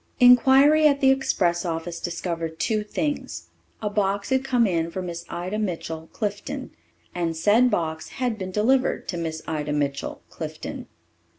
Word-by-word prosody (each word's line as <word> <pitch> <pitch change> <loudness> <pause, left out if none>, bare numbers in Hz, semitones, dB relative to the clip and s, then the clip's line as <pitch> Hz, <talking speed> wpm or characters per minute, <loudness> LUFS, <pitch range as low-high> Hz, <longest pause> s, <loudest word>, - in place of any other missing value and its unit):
Inquiry 270 +5 +7
at 280 -1 +2
the 265 -1 +5
express 180 -10 +1
office 170 0 -3
discovered 165 -2 -4
two 215 -1 0
things. 290 +7 -3 0.3
A 210 - 0
box 200 -1 0
had 265 0 +2
come 250 -3 +2
in 170 -4 0
for 180 - -5
Miss 170 -2 -5
Ida 185 +5 -3
Mitchell, 165 -5 -4
Clifton; 255 +6 -4 0.4
and 165 -2 -2
said 215 +9 +4
box 160 -6 -2
had 250 -4 -2
been 185 -1 -4
delivered 255 +7 +1
to 175 - -2
Miss 160 -1 -4
Ida 150 -2 -2
Mitchell, 140 -1 -2
Clifton. - - -6
195 Hz, 155 wpm, -24 LUFS, 165-250 Hz, 0.4 s, Inquiry